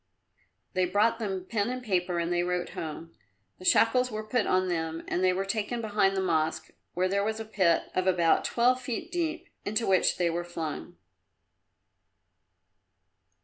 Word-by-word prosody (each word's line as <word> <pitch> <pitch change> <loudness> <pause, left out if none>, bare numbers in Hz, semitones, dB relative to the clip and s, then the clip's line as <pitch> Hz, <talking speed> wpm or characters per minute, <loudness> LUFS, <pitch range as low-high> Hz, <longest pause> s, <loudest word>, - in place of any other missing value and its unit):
They 185 0 +2
brought 205 +6 +2
them 190 -4 -3
pen 215 -1 0
and 255 0 -4
paper 180 -5 0
and 170 +1 0
they 175 - +2
wrote 180 0 -1
home. 165 +1 -7 0.5
The 185 - -10
shackles 250 +6 +4
were 215 -2 -4
put 230 0 +1
on 185 0 +2
them 165 -2 -2
and 180 - -1
they 185 - +5
were 190 +2 -1
taken 215 +4 -2
behind 205 -3 +1
the 190 - +1
Mosque, 160 -3 0 0.2
where 185 +1 +2
there 200 +1 +1
was 220 +1 -2
a 220 - -5
pit 190 -6 +2
of 185 0 0
about 175 -3 +3
twelve 250 +2 +2
feet 250 -3 -4
deep, 340 0 -2 0.2
into 215 +3 -1
which 190 -1 +3
they 175 -2 +1
were 175 +1 -2
flung. 175 0 -6
190 Hz, 170 wpm, -28 LUFS, 175-220 Hz, 0.5 s, they